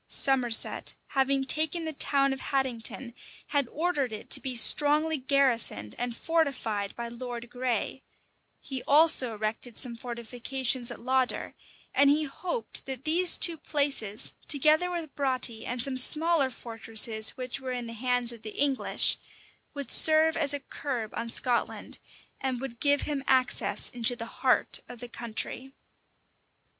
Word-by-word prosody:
Somerset, 250 -4 +2
having 270 0 0
taken 315 +4 -1
the 315 - -5
town 275 -1 +2
of 270 - -7
Haddington, 255 -2 -3 0.4
had 285 -4 0
ordered 295 -4 -2
it 215 - -9
to - - +8
be 260 -2 -4
strongly 300 +5 +3
garrisoned 250 - +1
and 240 -1 -4
fortified 260 -11 -2
by 235 0 -5
Lord 240 0 -8
Grey: 250 +1 -3 0.6
he 265 -2 -6
also 285 -6 +4
erected 215 +2 -4
some 245 -3 +3
fortifications 245 +1 -1
at - - -7
Lauder; 260 +1 0 0.4
and 280 0 +5
he 300 +2 +2
hoped 360 - -4
that 265 -1 -6
these 340 +3 +3
two 335 -2 +3
places, 280 -10 -1
together 310 +4 +4
with 335 -4 -6
Broughty 255 -5 -2
and 245 -1 -2
some 265 -1 -2
smaller 310 +1 +3
fortresses 225 -2 0
which 255 +1 -4
were 260 -1 -6
in 245 -1 -4
the 230 - -8
hands 245 +1 +1
of 235 -2 -12
the 215 -1 -9
English, 275 -2 +3 0.6
would 280 -4 -4
serve 315 0 +5
as 295 -3 +3
a 285 - -1
curb 255 -5 -6
on 230 - -5
Scotland, 240 +1 -1 0.4
and 260 -2 -3
would 245 -3 -8
give 285 0 +2
him 285 -3 -4
access 260 -1 +1
into 245 0 -1
the 230 -1 -6 0.2
heart 260 -2 +2
of 245 - -10
the 245 - -8
country. 240 +3 -4
260 Hz, 150 wpm, -27 LUFS, 235-285 Hz, 0.6 s, to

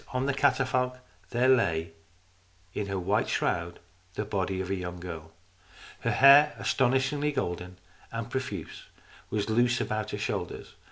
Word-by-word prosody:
On 130 +1 0
the 140 - +1
catafalque 130 -2 +1 0.3
there 125 +1 +2
lay 85 -11 +2 0.8
in 105 - -3
her 100 -1 -2
white 90 - 0
shroud - - -1 0.4
the 105 - -2
body 95 -2 -2
of 95 0 -3
a - - +1
young 90 -1 -5
girl. 80 -3 -8 0.7
Her - - -1
hair, 140 +2 +7
astonishingly 135 +3 +1
golden 90 -8 -3 0.3
and 115 -1 -4
profuse, 130 +1 -5 0.4
was 105 -2 -1
loose 120 +2 +3
about 110 -1 -2
her - - -4
shoulders. - - -4
115 Hz, 145 wpm, -28 LUFS, 95-130 Hz, 0.8 s, hair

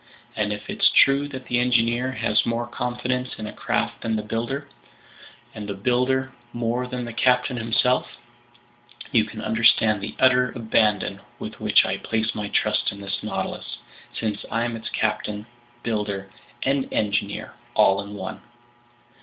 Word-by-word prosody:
And 105 -1 0
if 105 0 -4
it's - - +3
true 140 +1 +5
that 130 -2 -7
the 120 - +1
engineer 120 +1 +2
has 110 -3 +2
more 115 0 -1
confidence 125 +1 -2
in 110 - -5
a 105 - -6
craft - - -1
than 115 -1 0
the 105 - -1
builder, 120 +7 -3 0.9
and 105 -1 -6
the 100 - -2
builder 125 +5 +1 0.2
more 120 +1 -1
than 125 -1 -4
the 120 - -6
captain 125 +1 +3
himself, 115 +2 +1 0.9
you 110 -2 +4
can 110 0 -8
understand 110 -2 +4
the 100 - -5
utter 125 -1 +4
abandon 110 -3 +1 0.2
with - - -7
which - - +5
I - - -1
place 110 0 -1
my 105 -1 -3
trust - - +1
in 100 - -10
this 100 -1 -4
Nautilus, - - -4 0.4
since 105 -2 -2
I'm 115 +1 0
its 115 - -6
captain, 105 -1 -1 0.4
builder, 105 -4 -2 0.3
and 135 0 +1
engineer 100 -1 -1 0.2
all 95 0 +5
in 100 +1 -8
one!" 95 -2 -6
115 Hz, 155 wpm, -24 LUFS, 105-125 Hz, 0.9 s, true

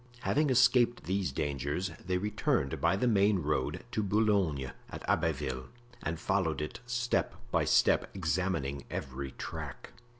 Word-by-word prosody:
Having 150 0 +2
escaped 120 -1 +4
these 95 -3 -1
dangers, 75 +5 -2
they 90 0 0
returned 100 -8 0
by 85 +2 +3
the 125 +6 +1
main 105 -2 +4
road 75 -3 -1
to 110 - 0
Boulogne, 100 -10 +1 0.2
at - - -8
Abbeville, 65 0 0 0.3
and 80 -1 -3
followed 80 -6 0
it 75 0 -4
step 120 0 0 0.2
by - - +2
step, - - +4
examining 75 -6 -1
every 65 0 -5
track. - - -7
90 Hz, 135 wpm, -31 LUFS, 70-105 Hz, 0.3 s, escaped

